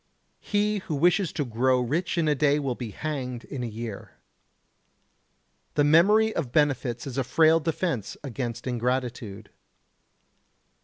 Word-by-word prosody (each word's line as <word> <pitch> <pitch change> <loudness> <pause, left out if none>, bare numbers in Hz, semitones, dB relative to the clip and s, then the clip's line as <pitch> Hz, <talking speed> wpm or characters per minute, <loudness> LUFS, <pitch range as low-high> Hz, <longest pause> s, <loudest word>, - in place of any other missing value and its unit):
He 210 0 0
who 175 -5 -4
wishes 175 +4 +2
to 145 - -1
grow 125 +2 +2
rich 160 +9 -1
in 165 -2 +2
a 150 - +4
day 145 0 +2
will 135 -4 -1
be 120 -2 -6
hanged 125 -1 -4
in 135 - -6
a - - -2
year. 110 -2 -7 1.6
The 145 - +3
memory 205 +9 +4
of 140 -8 -2
benefits 135 -5 +1
is 135 -1 -4
a - - +1
frail 160 +5 +4
defence 165 - -2
against 120 -3 -5
ingratitude. 120 -4 -3
135 Hz, 140 wpm, -26 LUFS, 120-160 Hz, 1.6 s, a